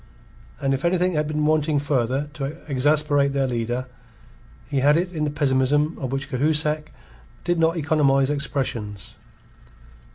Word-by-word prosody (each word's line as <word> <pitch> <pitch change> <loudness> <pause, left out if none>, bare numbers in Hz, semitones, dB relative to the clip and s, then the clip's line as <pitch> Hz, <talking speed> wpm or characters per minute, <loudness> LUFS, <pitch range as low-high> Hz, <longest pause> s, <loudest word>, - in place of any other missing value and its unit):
And 135 -1 0
if 135 - -2
anything 180 +1 +2
had 150 -1 0
been 150 0 -1
wanting 155 -1 +2
further 140 -1 0
to 140 -3 -4 0.2
exasperate 145 0 +2
their 135 -1 +1
leader, 120 +1 -2 0.8
he 140 - -1
had 145 +3 +4
it 180 +1 -2
in 155 -2 -1
the - - 0
pessimism 145 +2 +1
of 130 -4 -4
which 135 +1 -3
Cahusac 150 +3 +1 0.5
did 175 -1 0
not 165 +1 +2
economize 145 -3 +2
expressions. 115 -8 -3
145 Hz, 140 wpm, -23 LUFS, 135-155 Hz, 0.8 s, had